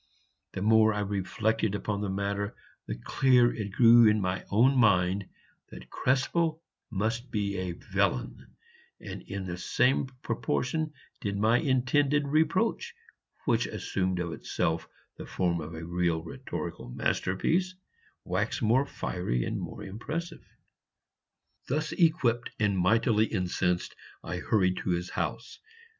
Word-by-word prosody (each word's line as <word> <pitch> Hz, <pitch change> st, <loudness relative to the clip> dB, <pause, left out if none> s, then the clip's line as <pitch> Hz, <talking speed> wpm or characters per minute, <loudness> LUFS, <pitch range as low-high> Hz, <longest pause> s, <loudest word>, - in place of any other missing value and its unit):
The 95 Hz, -, -3 dB
more 110 Hz, 0 st, +5 dB
I 105 Hz, -, -1 dB
reflected 105 Hz, +2 st, -1 dB
upon 100 Hz, 0 st, -2 dB
the 105 Hz, -, -2 dB
matter, 100 Hz, +3 st, -2 dB, 0.3 s
the -, -, -3 dB
clearer 125 Hz, -2 st, +3 dB
it 105 Hz, -3 st, -4 dB
grew 115 Hz, +1 st, +7 dB
in 105 Hz, 0 st, +2 dB
my 95 Hz, 0 st, -2 dB
own 125 Hz, +7 st, +4 dB
mind 95 Hz, -4 st, +3 dB, 0.4 s
that -, -, -12 dB
Krespel 160 Hz, +5 st, 0 dB, 0.3 s
must 115 Hz, +4 st, -2 dB
be 100 Hz, -3 st, -1 dB
a 90 Hz, -1 st, -3 dB
villain, -, -, -2 dB, 0.4 s
and -, -, -7 dB
in 100 Hz, -1 st, -6 dB
the 90 Hz, -1 st, -5 dB
same 130 Hz, +6 st, +2 dB, 0.2 s
proportion 150 Hz, +6 st, -1 dB, 0.3 s
did 100 Hz, -1 st, -3 dB
my 110 Hz, +4 st, +3 dB
intended 140 Hz, +1 st, +2 dB
reproach, 185 Hz, -, +1 dB, 0.5 s
which 120 Hz, -1 st, +2 dB
assumed 95 Hz, -3 st, -2 dB
of 85 Hz, -2 st, -3 dB
itself 80 Hz, +1 st, -2 dB, 0.3 s
the -, -, -8 dB
form 85 Hz, -2 st, 0 dB
of 80 Hz, +2 st, -7 dB
a 80 Hz, +1 st, -6 dB
real 85 Hz, -1 st, 0 dB
rhetorical 80 Hz, -6 st, -6 dB
masterpiece, 165 Hz, -, 0 dB, 0.5 s
wax 100 Hz, +5 st, -1 dB
more 125 Hz, +5 st, +3 dB
fiery 60 Hz, -, -2 dB
and -, -, -3 dB
more -, -, -7 dB
impressive. 160 Hz, -, -5 dB, 1.3 s
Thus 150 Hz, +4 st, -1 dB
equipped 130 Hz, -9 st, +2 dB
and 105 Hz, -2 st, +2 dB
mightily 110 Hz, +4 st, +3 dB
incensed, 90 Hz, -2 st, -1 dB, 0.3 s
I 90 Hz, -, -4 dB
hurried 95 Hz, 0 st, +1 dB
to -, -, -3 dB
his 90 Hz, 0 st, -1 dB
house. -, -, -4 dB
105 Hz, 130 wpm, -29 LUFS, 90-125 Hz, 1.3 s, grew